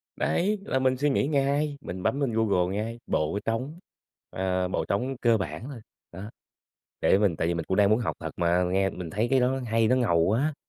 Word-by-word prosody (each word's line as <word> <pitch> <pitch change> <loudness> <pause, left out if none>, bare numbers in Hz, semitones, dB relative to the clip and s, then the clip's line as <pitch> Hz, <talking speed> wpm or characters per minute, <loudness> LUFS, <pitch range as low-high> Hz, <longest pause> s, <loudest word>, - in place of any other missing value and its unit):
Đấy, 205 +4 0
là 130 - 0
mình 130 -1 +1
suy 145 +2 +1
nghĩ 135 0 +1
ngay, 145 0 0
mình 90 -5 -7
bấm 140 - 0
lên 125 -5 0
Google 100 -4 +1
ngay: 115 +3 -4
"bộ 80 +7 0
trống" 130 +9 -3 0.5
ờ, 95 -1 -1
bộ - - -2
trống 130 +7 -1
cơ 115 -2 +4
bản 80 0 -5
thôi, 120 -5 -9 0.3
đó, 95 +5 -8 0.7
để 95 - +4
mình 105 -2 +3
tìm, 80 - -7
tại 80 +2 -1
vì 85 - 0
mình 85 - -3
cũng 95 - -1
đang 100 0 +4
muốn 110 - +4
học 120 - -2
thật 80 - -4
mà, 85 +1 +2
nghe 95 +2 +1
mình 90 -3 -7
thấy 110 +4 -1
cái 135 -1 +4
đó 130 +2 +1
hay 115 -1 +2
nó 130 - +3
ngầu 105 -10 +2
quá. 125 - +1
110 Hz, 230 wpm, -26 LUFS, 90-130 Hz, 0.7 s, cơ